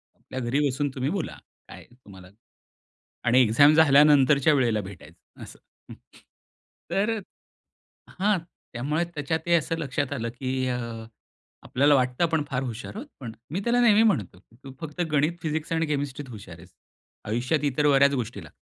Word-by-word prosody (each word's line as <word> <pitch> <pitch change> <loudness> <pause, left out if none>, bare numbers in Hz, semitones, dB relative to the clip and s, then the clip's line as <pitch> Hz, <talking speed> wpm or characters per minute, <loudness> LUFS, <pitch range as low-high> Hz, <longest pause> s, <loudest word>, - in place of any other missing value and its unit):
आपल्या 130 - -8
घरी 125 +3 -1
बसून 140 +2 -1
तुम्ही 130 +1 -1
बोला, 195 -5 -4 0.3
काय - - -12
तुम्हाला? 95 -7 -15 1.0
आणि 120 +2 +4
एक्झाम 145 +7 +5
झाल्यानंतरच्या 145 -1 +5
वेळेला 120 -6 +1
भेटायचं 95 -4 -13
असं. - - -12 0.3
हं. - - -8 1.0
तर 205 +4 +1 1.1
हां, 205 0 +2 0.3
त्यामुळे 150 +7 -1
त्याच्या 150 +2 -2
ते 170 - +3
असं 165 0 +1
लक्षात 145 -2 -3
आलं, 115 -4 -3
की 130 +1 -3
अ, 125 -1 -1 0.8
आपल्याला 145 +3 +3
वाटतं 130 +4 +1
आपण 160 -3 0
फार 125 -1 -1
हुशार 120 - -6
आहोत. 245 +7 -7
पण 120 -4 -7 0.2
मी 185 - -1
त्याला 240 +1 +2
नेहमी 220 -3 +5
म्हणतो, 110 - 0
की 110 +5 -25
तू 135 - -9
फक्त 160 +2 -7
गणित, 150 +3 +2
फिजिक्स 155 +1 -3
आणि 165 0 0
केमिस्ट्रीत 145 -1 -3
हुशार 100 -7 -10
आहेस, 85 +2 -17 0.5
आयुष्यात 125 +8 -1
इतर 145 +1 +1
बऱ्याच 140 0 +4
गोष्टी 120 -3 -4
ला - - -13
140 Hz, 160 wpm, -25 LUFS, 125-155 Hz, 1.1 s, एक्झाम